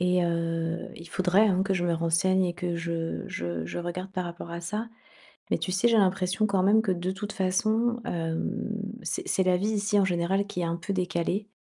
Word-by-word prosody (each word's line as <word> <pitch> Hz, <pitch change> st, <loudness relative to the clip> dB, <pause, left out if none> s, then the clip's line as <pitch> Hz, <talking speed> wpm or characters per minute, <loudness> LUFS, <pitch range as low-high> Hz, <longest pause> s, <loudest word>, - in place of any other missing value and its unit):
et 180 Hz, 0 st, +3 dB
heu, 165 Hz, 0 st, -1 dB
il 170 Hz, 0 st, -11 dB
faudrait, 190 Hz, +5 st, +3 dB
hein, 190 Hz, -1 st, +3 dB
que 195 Hz, -1 st, +1 dB
je 175 Hz, -1 st, 0 dB
me 175 Hz, -, +2 dB
renseigne 170 Hz, +3 st, +2 dB
et 175 Hz, -, 0 dB
que 175 Hz, -1 st, -2 dB
je 165 Hz, 0 st, -3 dB
je 85 Hz, -1 st, -4 dB
je -, -, -5 dB
regarde 180 Hz, +2 st, -5 dB
par 185 Hz, -2 st, -2 dB
rapport 170 Hz, 0 st, -7 dB
à 170 Hz, 0 st, -4 dB
ça 210 Hz, +6 st, -3 dB, 0.6 s
mais -, -, +3 dB
tu 185 Hz, -, -3 dB
sais, 195 Hz, +6 st, +3 dB
j'ai 230 Hz, -, +4 dB
l'impression 190 Hz, 0 st, +2 dB
quand 195 Hz, -2 st, +2 dB
même 210 Hz, +3 st, +5 dB
que 215 Hz, -4 st, 0 dB
de 180 Hz, +1 st, -2 dB
toute 205 Hz, +2 st, -5 dB
façon 220 Hz, +6 st, +1 dB
hem, 165 Hz, +5 st, -2 dB, 0.2 s
c'est -, -, -3 dB
c'est 190 Hz, -, +2 dB
la 180 Hz, -1 st, +3 dB
vie 200 Hz, +4 st, 0 dB
ici 210 Hz, -1 st, +2 dB
en 195 Hz, -, +4 dB
général 185 Hz, +2 st, +1 dB
qui 180 Hz, -3 st, -3 dB
est -, -, 0 dB
un 170 Hz, 0 st, -1 dB
peu 185 Hz, +4 st, -3 dB
décalée. 185 Hz, +2 st, -1 dB
185 Hz, 220 wpm, -27 LUFS, 170-200 Hz, 0.6 s, même